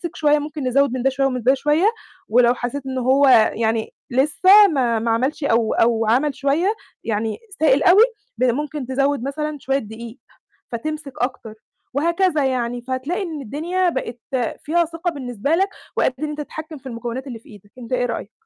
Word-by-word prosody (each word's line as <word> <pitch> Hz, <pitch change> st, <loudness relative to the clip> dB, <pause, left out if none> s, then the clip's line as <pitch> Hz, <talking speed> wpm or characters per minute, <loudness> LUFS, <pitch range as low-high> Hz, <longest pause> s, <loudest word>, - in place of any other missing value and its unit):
شوية، 300 Hz, -1 st, +3 dB
ممكن 295 Hz, 0 st, -6 dB
نزوّد 275 Hz, +1 st, +3 dB
من 255 Hz, -1 st, -3 dB
ده 270 Hz, -, +4 dB
شوية 270 Hz, +1 st, 0 dB
ومن 255 Hz, -3 st, -3 dB
ده 260 Hz, +2 st, +5 dB
شوية، 295 Hz, +6 st, +1 dB, 0.4 s
ولو 240 Hz, +1 st, +5 dB
حسيت 250 Hz, +3 st, -5 dB
إن 260 Hz, -1 st, -4 dB
هو 265 Hz, +3 st, +3 dB, 0.3 s
يعني 225 Hz, 0 st, -1 dB, 0.2 s
لسه 370 Hz, +11 st, +6 dB
ما 250 Hz, -, +1 dB
ما 230 Hz, +1 st, 0 dB
عَمَلش 265 Hz, +7 st, -1 dB
أو 230 Hz, -4 st, +2 dB
أو 230 Hz, -1 st, +2 dB
عَمَل 270 Hz, +6 st, +2 dB
شوية، 315 Hz, +9 st, +1 dB, 0.3 s
يعني 220 Hz, 0 st, -2 dB, 0.2 s
سائل 285 Hz, -2 st, +4 dB
أوي، 390 Hz, +5 st, +7 dB, 0.3 s
ب -, -, -1 dB
ممكن 290 Hz, +3 st, -2 dB
تزوّد 275 Hz, -1 st, 0 dB
مثلًا 300 Hz, +2 st, -3 dB
شوية 270 Hz, 0 st, 0 dB
دقيق 225 Hz, +1 st, -9 dB, 0.5 s
فتمسك 295 Hz, +4 st, -5 dB
أكتر، 245 Hz, -4 st, -4 dB, 0.4 s
وهكذا 335 Hz, 0 st, +1 dB
يعني، 245 Hz, -2 st, -1 dB
فهتلاقي 260 Hz, +9 st, -3 dB
إن 320 Hz, -5 st, -5 dB
الدنيا 340 Hz, -, -1 dB
بقِت 245 Hz, -5 st, -4 dB, 0.4 s
فيها 340 Hz, +3 st, +2 dB
ثقة 335 Hz, +2 st, -3 dB
بالنسبة 260 Hz, +1 st, -2 dB
لك 390 Hz, +3 st, +1 dB, 0.3 s
وقادر 255 Hz, -, +2 dB
إن 305 Hz, 0 st, -2 dB
أنت 300 Hz, 0 st, -5 dB
تتحكّم 310 Hz, +1 st, -8 dB
في 265 Hz, -, -12 dB
المكونات 240 Hz, +3 st, -5 dB
اللي 235 Hz, -3 st, -7 dB
في -, -, -21 dB
إيدك، 205 Hz, -1 st, -16 dB
أنت 245 Hz, +1 st, -7 dB
إيه 245 Hz, -1 st, +1 dB
رأيك؟ 230 Hz, -3 st, -4 dB
270 Hz, 180 wpm, -21 LUFS, 240-305 Hz, 0.5 s, أوي